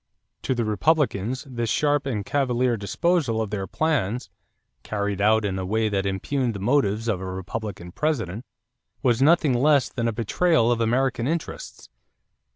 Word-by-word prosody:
To 130 - -1
the 120 -2 -1
Republicans 130 -1 +1
this 120 -3 -3
sharp 145 +1 +1
and 105 -7 -2
cavalier 125 -3 +1
disposal 120 - 0
of 110 -2 -2
their 100 -2 -3
plans, 125 - -1 0.5
carried 100 -1 -2
out 110 +1 +3
in 95 -2 -2
a - - -3
way 110 +3 0
that 100 -1 -1
impugned 115 +5 -1
the - - -5
motives 115 -1 +1
of 100 -5 0
a - - -5
Republican 95 -1 -6
President, 115 - -2 0.6
was 125 -2 +2
nothing 155 -1 +4
less 140 +2 +3
than 115 -2 -2
"a - - +1
betrayal 120 - +2
of 120 -1 0
American 125 +1 +1
interests." 165 +1 -5
115 Hz, 160 wpm, -24 LUFS, 105-135 Hz, 0.6 s, nothing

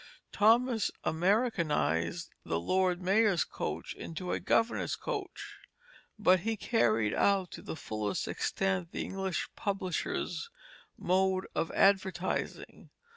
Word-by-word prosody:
Thomas 225 +1 +3
Americanized 165 - +1
the 80 - -1
Lord 185 - +1
Mayor's 195 -1 +3
coach - - -5
into 180 +2 -6
a - - 0
Governor's 230 +1 +1
coach, 410 -6 -5 0.6
but 185 -3 +5
he 225 +4 -2
carried 110 - +2
out 195 -3 +2
to - - -8
the - - -6
fullest 110 -8 -3
extent 95 -3 -1
the - - -2
English 190 -1 -2
publishers' 195 - -2 0.5
mode 190 +1 +1
of 165 - -1
advertising. 190 -2 0
185 Hz, 110 wpm, -31 LUFS, 160-210 Hz, 0.6 s, but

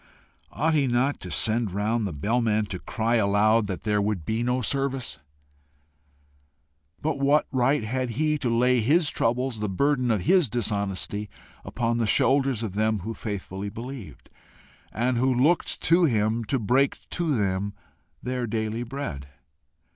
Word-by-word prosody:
Ought 160 +2 0
he 145 -3 +2
not 125 +4 +1
to 90 - -6
send 110 +7 +2
round 105 +2 0
the - - -4
bell 105 +12 0
man 110 -2 +1
to 95 -3 -6
cry 115 +4 -1
aloud 105 +1 +3
that 95 -2 -5
there 105 -1 +1
would 100 -6 -2
be 110 +5 -1
no 125 +1 0
service? 135 - -1 1.8
But 150 -2 -2
what 140 +2 +3
right 130 0 +2
had 125 +3 -2
he 150 0 +1
to 125 - -1
lay 125 +2 +3
his 145 +7 +3
troubles, 120 0 -1
the 105 -1 -2
burden 125 +5 +1
of 110 -4 +1
his 175 - +3
dishonesty, 100 -2 -2 0.3
upon 115 -1 -1
the 115 - +1
shoulders 135 -1 +2
of 105 -5 -4
them 110 0 0
who 110 +5 -5
faithfully 100 -2 -5
believed, 120 +1 -9 0.6
and 120 +2 0
who 130 +1 +2
looked 140 +8 +1
to 170 +1 +4
him 110 -3 +1
to 135 - 0
break 130 +5 +1
to 165 -6 0
them 100 0 -1 0.5
their 125 -1 -2
daily 110 +1 -2
bread? 120 - -5
115 Hz, 155 wpm, -25 LUFS, 105-130 Hz, 1.8 s, to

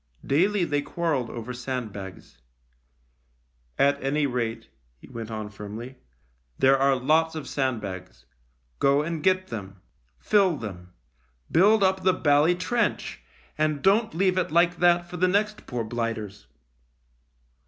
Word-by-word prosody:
Daily 190 +7 +2
they 145 -2 0
quarrelled 145 -6 -2
over 120 +1 -6
sandbags. 110 - -6 0.7
" - - -42
At 140 0 +2
any 145 +2 +1
rate," 115 -3 -3 0.3
he - - -16
went 115 -1 -7
on 110 -1 -5
firmly, 105 +6 -8 0.3
" - - -42
there 135 +1 +5
are 135 0 +3
lots 155 +5 +2
of 155 - -6
sandbags. 100 - -4 0.5
Go 140 +2 +3
and 165 0 -3
get 185 +2 +1
them. 100 -4 -7 0.4
Fill 190 - +2
them. 90 -6 -8 0.6
Build 205 +5 +5
up 190 0 +2
the 185 0 +3
bally 150 +2 +3
trench, 230 +7 -1 0.4
and 155 -2 0
don't 215 +1 +3
leave 185 +1 +2
it - - -1
like 170 +2 +3
that 175 0 +3
for 180 - -7
the 185 +2 +3
next 210 +3 0
poor 120 -2 -3
blighters. 110 -3 -4
135 Hz, 140 wpm, -26 LUFS, 110-175 Hz, 0.7 s, there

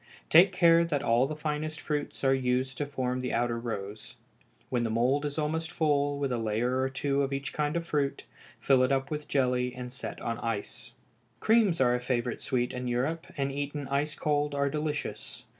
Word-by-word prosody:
Take 175 +4 +8
care 170 -2 +5
that 150 -4 -1
all 120 +3 +3
the 155 - -4
finest 155 +1 -3
fruits 150 -2 -3
are 135 0 +4
used 130 0 0
to 145 - -1
form 130 -2 -2
the 125 - -2
outer 120 0 0
rows. 105 -3 -6 0.5
When 120 -2 0
the 115 - 0
mould 125 +6 +2
is 145 0 -3
almost 160 +1 -1
full, 145 -3 +1
with 140 -2 -1
a 120 - 0
layer 115 +4 0
or 130 - +1
two 140 +1 0
of 135 0 -1
each 140 -1 -3
kind 150 +2 0
of 170 - -3
fruit, 145 -4 -1 0.4
fill 135 -2 +4
it 130 +1 +3
up 135 +1 0
with 150 -1 -4
jelly 125 -2 +1
and 125 0 -7
set 130 - -6
on 115 0 -3
ice. 115 -3 -4 0.5
Creams 220 -6 +3
are 125 -2 +4
a 125 - +1
favorite 125 -1 -2
sweet 125 0 -1
in 125 0 -4
Europe, 130 +7 -1
and 140 0 0
eaten 145 0 -4
ice 145 +2 0
cold 145 -1 0
are 140 0 +1
delicious. 150 0 -4
140 Hz, 200 wpm, -29 LUFS, 125-150 Hz, 0.5 s, Take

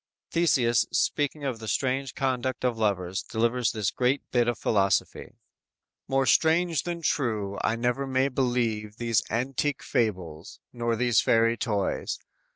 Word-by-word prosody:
Theseus 125 -9 +2
speaking 145 0 0
of 130 -5 -2
the 110 - -8
strange 130 +4 -1
conduct 130 -1 -1
of 125 -2 +1
lovers, 100 -3 -1
delivers 115 +3 0
this 105 -4 -1
great 130 +3 0
bit 120 -1 +2
of 120 - 0
philosophy: 100 -3 0 0.7
_"More 135 0 +2
strange 165 +1 +3
than 170 -1 -4
true, 110 -10 -1
I 115 - +1
never 125 +3 -1
may 130 0 +2
believe 120 -5 -1
These 115 -3 +1
antique 135 +4 -1
fables, 90 -4 -2
nor 120 -1 -1
these 120 -1 +3
fairy 115 0 +3
toys. 105 -5 -2
120 Hz, 140 wpm, -27 LUFS, 110-135 Hz, 0.7 s, strange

